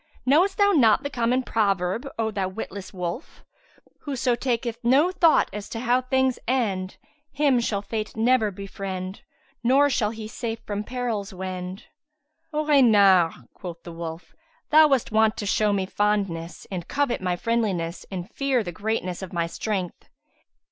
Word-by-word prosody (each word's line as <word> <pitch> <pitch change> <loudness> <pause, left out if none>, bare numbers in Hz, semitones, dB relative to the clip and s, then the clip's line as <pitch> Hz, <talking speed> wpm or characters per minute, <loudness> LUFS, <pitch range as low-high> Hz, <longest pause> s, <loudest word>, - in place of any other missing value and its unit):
Knowest 345 +9 +3
thou 405 0 +5
not 245 - +4
the 285 - -4
common 250 +1 +1
proverb, 200 +1 0
O 220 -1 0
thou 195 -3 -1
witless 190 0 -7
wolf, 180 - -6 0.6
'Whoso 265 -3 -1
taketh 235 -2 -2
no 275 +9 +4
thought 345 -3 +4
as 210 0 -6
to 225 - -5
how 250 +1 +2
things 260 0 +1
end, 200 -7 -1 0.3
him 280 -4 +2
shall 205 -4 -1
Fate 215 0 -4
never 230 -1 +3
befriend 195 -1 -6 0.4
nor 275 +4 +4
shall 215 -4 +1
he 220 -1 -7
safe 230 0 -4
from 205 0 -3
perils 225 -5 -3
wend." 185 +1 -5 0.7
"O 305 0 -1
Reynard," 200 - +5
quoth 175 -2 -9
the 170 - -9
wolf, 165 0 -7 0.4
"thou 310 0 +8
was 270 -5 +2
wont 220 0 +3
to 205 - -4
show 210 +1 +2
me 195 -2 0
fondness 195 -5 -1
and 180 -3 -5
covet 280 -6 0
my 180 -1 0
friendliness 190 -6 -1
and 185 -2 -5
fear 265 -1 0
the 175 - -5
greatness 190 -1 -3
of 190 - -7
my 170 -1 0
strength. 185 +1 -4
215 Hz, 155 wpm, -25 LUFS, 185-255 Hz, 0.7 s, thou